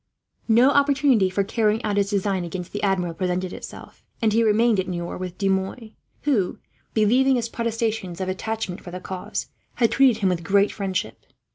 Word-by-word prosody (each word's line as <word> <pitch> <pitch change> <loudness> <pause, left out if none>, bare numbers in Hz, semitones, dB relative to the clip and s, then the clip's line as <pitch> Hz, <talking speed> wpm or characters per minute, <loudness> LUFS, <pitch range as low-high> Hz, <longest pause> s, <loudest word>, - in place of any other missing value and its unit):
No 240 +4 +5
opportunity 280 -8 +3
for 195 +2 0
carrying 215 +2 0
out 210 -2 -1
his 200 -1 +1
design 195 -2 0
against 175 +1 -6
the 205 - -4
Admiral 185 -4 0
presented 180 +1 -2
itself, - - -10 0.2
and 220 -3 +2
he 230 - +3
remained 220 0 +3
at 185 - -1
Niort 175 -1 -4
with 185 -1 -6
De 195 - 0
Mouy; 195 +4 -2 0.3
who, 230 -11 +1 0.4
believing 250 +5 +4
his 235 -2 -1
protestations 225 -6 -2
of 190 - -2
attachment 190 0 -3
for - - -10
the 180 +1 -6
cause, 185 0 -5 0.3
had 230 -3 +2
treated 255 -5 +4
him 190 - +3
with 175 -2 -1
great 200 +3 +3
friendship. 195 -3 -4
205 Hz, 180 wpm, -23 LUFS, 185-230 Hz, 0.4 s, No